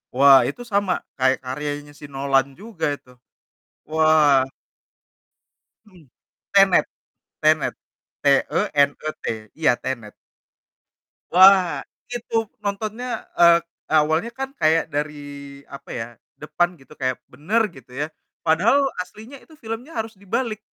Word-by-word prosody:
Wah, 135 0 +8
itu 245 - -5
sama 200 -5 -1 0.2
kayak 130 0 +3
karyanya 145 +3 -5
si - - -10
Nolan 135 0 +1
juga 195 -3 -5
itu, 125 - -20 0.8
wah. 155 -3 +4 1.4
Mhm. 180 - -20 0.4
Tenet, 195 -2 +5 0.6
Tenet, 155 -1 +3 0.5
T-E-N-E-T, 145 +2 +1 0.3
iya, 155 -6 +3
Tenet. 120 -5 -5 1.2
Wah, 185 -5 +6 0.3
itu 240 -1 -7 0.3
nontonnya 215 +4 -3 0.3
eee, 170 -1 +7 0.4
awalnya 160 +9 0
kan 270 0 -2
kayak 160 +1 +3
dari, 150 +1 -2 0.6
apa - - -14
ya, 115 - -3 0.4
depan 175 +3 0
gitu, 135 +3 -17
kayak 130 -1 -1
benar, 175 - 0
gitu 130 -2 -16
ya, 140 +4 -2 0.4
padahal 175 - +4 0.3
aslinya 220 +8 -13
itu 320 - -19
filmnya 225 +7 -6
harus 225 0 -4
dibalik, 215 +3 -3
160 Hz, 110 wpm, -22 LUFS, 140-205 Hz, 1.4 s, Wah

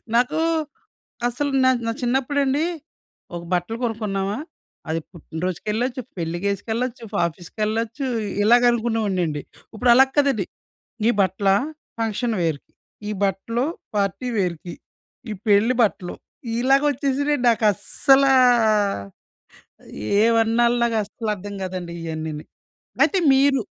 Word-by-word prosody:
నాకు 245 +6 +2 0.9
అసలు 275 +4 -2
నా 260 - +5 0.2
నా - - +1
చిన్నప్పుడండి 270 +4 +1 0.7
ఒక 170 - -5
బట్టలు 180 +6 -1
కొనుక్కున్నామా, 210 -3 -2 0.5
అది 160 +1 0
పుట్టిన 160 -1 -9
రోజుకెళ్ళొచ్చు, 220 +8 -2 0.2
పెళ్ళికేసుకెళ్ళొచ్చు. 200 +8 -2
ఫా - - -1
ఆఫీస్‌కెళ్ళొచ్చు. 215 - -3 0.4
ఇలాగ 240 +3 +5
అనుకునే 235 -1 0
వాడినండి. 175 -7 -1 0.3
ఉప్పుడు 245 +3 +1
అలా 265 +2 +7
కాదండి! 275 -9 +2 0.6
ఈ - - +6
బట్టలా, 195 +1 +2 0.5
ఫంక్షన్ 225 +1 -1
వేర్‌కి, 160 -4 -3 0.4
ఈ - - -2
బట్టలు 200 +6 -1 0.3
పార్టీ 200 +5 -1
వేర్‌కి, 175 -2 -2 0.6
ఇయి 210 - -4
పెళ్ళి 210 +5 +4
బట్టలు. 190 -4 -1 0.5
ఇలాగ 270 +3 +4
వచ్చేసినీయండి. 280 0 0
నాకస్సలా 270 - +3 1.9
ఏమాన్నాల 230 +1 +3
నాకస్సలర్థం 210 -3 -2
కాదండి 180 -2 -5
ఇయన్నీనీ. 160 -2 -5 0.6
అయితే 390 - +1
మీరు, 270 -1 +3
225 Hz, 100 wpm, -22 LUFS, 190-250 Hz, 1.9 s, అలా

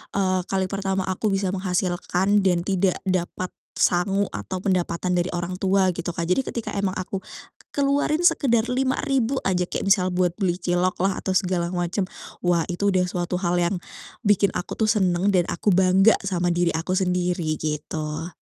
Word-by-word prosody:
eee, 185 -2 +2
kali 190 -1 -1
pertama 195 -1 -1
aku 190 +3 -2
bisa 195 -2 0
menghasilkan 185 +1 0
dan 180 -3 +2
tidak 190 -1 +1
dapat 185 -1 -2 0.2
sangu 195 +3 +2
atau 185 - -4
pendapatan 180 -2 0
dari 175 0 +1
orang 175 +1 -3
tua 190 -1 +3
gitu 175 0 -3
Kak. 170 - -2
Jadi 185 +9 +2
ketika 235 - -4
emang 200 -1 0
aku 190 +1 -4 0.6
keluarin 285 +2 +1
sekedar 240 -9 +3
Rp5.000 260 0 0
aja, 180 -2 +1
kayak - - -3
misal 185 -2 +3
buat 180 -1 +1
beli 185 -4 +1
cilok 180 +1 0
lah 195 -1 +1
atau 190 - -2
segala 180 -2 0
macam, 175 +2 -1 0.4
wah, 175 -2 +2
itu 190 +4 -1
udah 185 -1 +2
suatu 180 0 -2
hal 175 -1 0
yang 175 +2 +1 0.5
bikin 200 -2 +4
aku 180 - -4
tuh 220 - +2
seneng 190 -3 +1
dan 180 -2 +3
aku 205 - +1
bangga 190 +3 +5
sama 180 -2 0
diri 175 0 +1
aku 165 +3 -2
sendiri, 180 -3 0
gitu. 150 +1 -3
185 Hz, 170 wpm, -24 LUFS, 175-195 Hz, 0.6 s, bangga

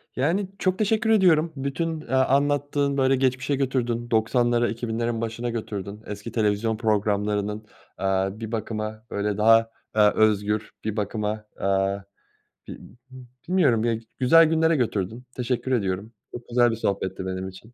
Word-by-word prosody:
Yani, 170 +9 0
çok 185 -1 +1
teşekkür 220 +1 +1
ediyorum, 170 -6 +4
bütün, 155 +4 -3
eee, - - -14
anlattığın, 140 +1 +2
böyle 135 0 +3
geçmişe 130 +1 0
götürdün 120 -3 -1
90'lara 120 +1 +2
2000'lerin 115 +1 -2
başına 115 +1 -3
götürdün, 105 -2 -5
eski 105 0 -7
televizyon 110 0 0
programlarının, 105 -1 0 0.3
aaa, 95 +2 -1
bir 110 -1 -6
bakıma, 110 -1 -4
böyle 100 0 -1
daha, 115 +1 +5 0.2
aaa, 105 -1 +5
özgür, 105 0 +1
bir 110 0 -3
bakıma, 105 +1 -2
aaa, 100 0 0 0.7
bi - - -7
b 125 +4 -17 0.3
bilmiyorum 145 -12 +3
ya, 115 - +2
g 115 0 -10
güzel 165 +6 +6
günlere 160 0 +3
götürdün, 115 -2 -2
teşekkür 125 +1 -2
ediyorum, 100 -2 -1 0.2
çok 120 - -9
güzel 120 -1 +4
bir - - -2
sohbetti 95 -3 -2
benim 95 0 -4
için. 110 +5 -15
115 Hz, 145 wpm, -24 LUFS, 105-130 Hz, 0.7 s, güzel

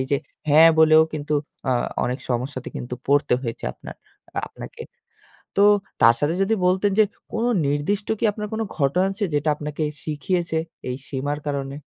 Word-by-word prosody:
এই 130 - -1
যে - - +5 0.3
হ্যাঁ 160 +3 +8
বলেও 155 0 +7
কিন্তু 150 0 -2 0.4
আ - - +4 0.3
অনেক 125 +2 -2
সমস্যাতে 130 +1 -2
কিন্তু 125 0 -5
পড়তে 140 -2 +3
হয়েছে 115 -3 -5
আপনার, - - -11 0.4
আ - - +1
আপনাকে। - - -10 0.7
তো 200 - +5 0.4
তার 115 +1 +8
সাথে 150 +3 +1
যদি 205 +3 +2
বলতেন 190 +3 +2
যে 215 - +7 0.3
কোনো 230 +2 0 0.2
নির্দিষ্ট 150 +9 -1
কি - - -2
আপনার 210 0 -5
কোনো 220 0 -1
ঘটনা 150 +5 +2
আছে 200 +2 -2
যেটা 145 +2 +1
আপনাকে 150 +1 -5 0.2
শিখিয়েছে 160 +2 -1 0.3
এই 125 - -2
সীমার 145 +2 -2
কারণে? 140 -1 -3
150 Hz, 165 wpm, -23 LUFS, 140-185 Hz, 0.7 s, হ্যাঁ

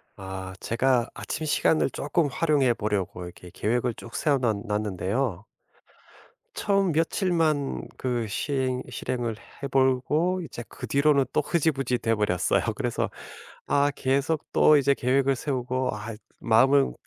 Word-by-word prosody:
아. 95 -1 -7
제가 120 0 +1
아침 155 0 -4
시간을 155 0 +2
쪼끔 150 +4 0
활용해 140 -2 +2
보려고 100 -4 -2
이렇게 90 0 -10
계획을 120 +2 0
쭉 115 - -11
세워 145 -2 +2
놨 110 -6 0
놨는데요. 105 +1 -2 1.1
처음 195 -2 +1
며칠만 160 -3 0
그 120 -3 -1
시행 130 +3 -1
실행을 120 -1 -3 0.3
해 - - 0
보고 135 +7 +2
이제 130 -7 -7
그 - - -8
뒤로는 140 -1 +3
또 - - +3
흐지부지 140 -6 0
돼 115 -1 0
버렸어요. 105 -4 +1
그래서 - - -1 0.6
아 145 0 +3
계속 140 +4 0
또 155 - +6
이제 140 -1 +3
계획을 135 +1 +2
세우고 130 -1 -1
아 105 +2 -6 0.3
마음을 130 +5 +4
130 Hz, 280 characters per minute, -26 LUFS, 115-145 Hz, 1.1 s, 또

